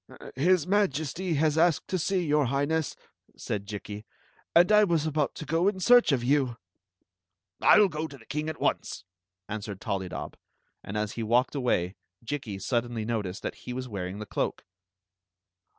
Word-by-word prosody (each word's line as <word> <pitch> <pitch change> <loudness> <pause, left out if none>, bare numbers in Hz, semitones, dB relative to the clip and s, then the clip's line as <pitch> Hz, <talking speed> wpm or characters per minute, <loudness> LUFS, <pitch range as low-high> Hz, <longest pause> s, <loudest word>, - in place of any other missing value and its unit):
"His 170 +4 +3
Majesty 180 -3 0
has 155 +1 +2
asked 170 -2 +3
to 185 - 0
see 185 +1 0
your 150 -1 +3
Highness," 145 +4 0 0.4
said 100 -1 -4
Jikki; 105 0 -6 0.3
" - - -35
and 175 +4 +6
I 210 0 +7
was 170 -6 +1
about 150 -2 0
to - - -7
go 165 +5 +1
in 200 -2 0
search 245 +1 +6
of 130 -4 +1
you." 130 -2 +1 0.5
" 90 0 -52
I - - +7
11 210 -1 +7
go 155 -1 -3
to 140 -2 -12
the 115 - -18
king 150 +2 -3
at 160 - -6
once, - - -1 0.4
answered 105 -2 -5
ToUydob, 95 -2 -4 0.5
and 100 - -5
as 105 -1 -1
he 115 - -5
walked 120 +3 +2
away 110 -9 0 0.3
Jikki 120 -6 -4
suddenly 120 +1 -2
noticed 105 -5 -3
that - - -3 0.2
he - - -2
was 130 +1 -4
wearing 95 -3 -5
the 105 - -6
cloak. - - -3
135 Hz, 175 wpm, -28 LUFS, 105-160 Hz, 0.5 s, I